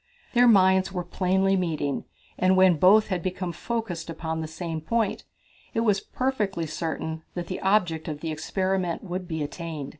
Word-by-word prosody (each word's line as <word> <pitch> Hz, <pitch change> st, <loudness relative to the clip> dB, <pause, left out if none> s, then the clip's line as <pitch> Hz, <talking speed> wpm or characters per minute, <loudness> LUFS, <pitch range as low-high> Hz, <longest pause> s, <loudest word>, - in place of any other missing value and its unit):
Their 245 Hz, 0 st, +6 dB
minds 190 Hz, -3 st, +5 dB
were 180 Hz, -2 st, -3 dB
plainly 190 Hz, +2 st, +1 dB
meeting, 155 Hz, -6 st, -1 dB, 0.3 s
and 185 Hz, +1 st, +3 dB
when 185 Hz, -3 st, +6 dB
both 205 Hz, +5 st, +6 dB
had 185 Hz, -3 st, -1 dB
become 180 Hz, 0 st, -3 dB
focused 195 Hz, -3 st, -4 dB
upon 160 Hz, -1 st, -3 dB
the 160 Hz, -, -4 dB
same 160 Hz, 0 st, -5 dB
point, 225 Hz, +5 st, -1 dB, 0.5 s
it 225 Hz, -, +2 dB
was 210 Hz, -4 st, +3 dB
perfectly 210 Hz, -11 st, -1 dB
certain 160 Hz, 0 st, -4 dB
that 175 Hz, -1 st, -3 dB
the -, -, -5 dB
object 180 Hz, -5 st, +1 dB
of 150 Hz, -2 st, -4 dB
the 160 Hz, -, -3 dB
experiment 185 Hz, +2 st, -1 dB
would 180 Hz, -1 st, -5 dB
be 160 Hz, -3 st, -2 dB
attained. 155 Hz, -2 st, -5 dB
180 Hz, 170 wpm, -26 LUFS, 160-195 Hz, 0.5 s, Their